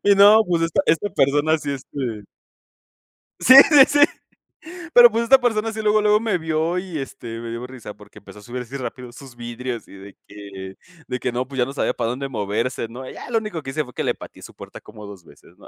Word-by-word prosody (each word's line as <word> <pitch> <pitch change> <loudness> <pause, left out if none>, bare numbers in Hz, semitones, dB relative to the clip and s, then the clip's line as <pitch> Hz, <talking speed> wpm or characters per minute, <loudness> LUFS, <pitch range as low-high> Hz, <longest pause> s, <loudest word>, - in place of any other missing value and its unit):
Y 200 - +4
no, 205 +3 +7
pues 170 -2 0
esta 165 -1 +1
esta 195 +5 +1
persona 145 +3 +1
sí, 145 -2 -4
este 125 -6 -6 1.1
sí, 260 - +6 0.2
sí, 285 -3 +8
sí. 290 0 +1 0.9
Pero, 240 -1 +9
pues, 230 +2 -1
esta 265 +3 +5
persona 225 -2 -1
sí, 220 0 -5
luego, 215 0 +2
luego 210 0 +3
me 220 -5 -1
vio 160 +2 -2
y, 180 -4 -6
este, 120 -4 -8
me 115 0 -7
dio 115 +2 -6
risa 125 -5 -11
porque 105 - -17
empezó 105 - -15
a 105 - -14
subir 125 +3 -6
así 130 +3 -9
rápido 125 -1 -7
sus 130 -1 -13
vidrios 120 0 -7
y - - -15
de 100 +1 -13
que 100 -2 -10 0.3
de 125 0 -3
que 125 - -3
no, 125 +1 -3
pues, 135 -2 -8
ya 125 - +3
no 135 - -8
sabía 140 - -1
para 115 - -3
dónde 135 +2 -4
moverse, 115 +1 -3
¿no? 130 +3 -9
Ya - - -10
lo 230 - +2
único 210 -8 -6
que 135 - -7
hice 155 +3 -2
fue 125 - -14
que - - -3
le - - 0
pateé - - -13
su - - -12
puerta - - -12
como 105 -1 -13
2 100 -4 -12
veces, 85 - -20
¿no? - - -17
135 Hz, 235 wpm, -21 LUFS, 115-195 Hz, 1.1 s, Pero